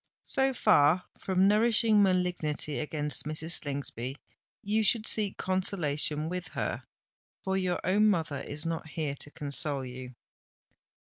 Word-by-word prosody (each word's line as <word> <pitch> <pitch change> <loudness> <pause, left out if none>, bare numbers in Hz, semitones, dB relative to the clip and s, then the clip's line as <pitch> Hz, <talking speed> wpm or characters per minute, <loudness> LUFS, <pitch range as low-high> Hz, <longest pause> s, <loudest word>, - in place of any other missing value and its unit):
"So 270 0 +2
far 180 - +4 0.2
from 190 0 +2
nourishing 215 0 +4
malignity 180 -6 0
against 150 -1 -2
Mrs. 155 +2 -3
Slingsby, 135 -2 -4 0.5
you 215 +2 +1
should 215 +1 +2
seek 210 -4 0
consolation 155 -5 +1
with 180 +1 -4
her; - - -3 0.6
for 190 0 -1
your 185 -2 0
own 205 +4 +3
mother 160 -7 -1
is 150 +2 -5
not 165 -1 -3
here 155 -2 -3
to 140 - -9
console 145 -1 -2
you!" 125 0 -9
165 Hz, 130 wpm, -29 LUFS, 145-195 Hz, 0.6 s, far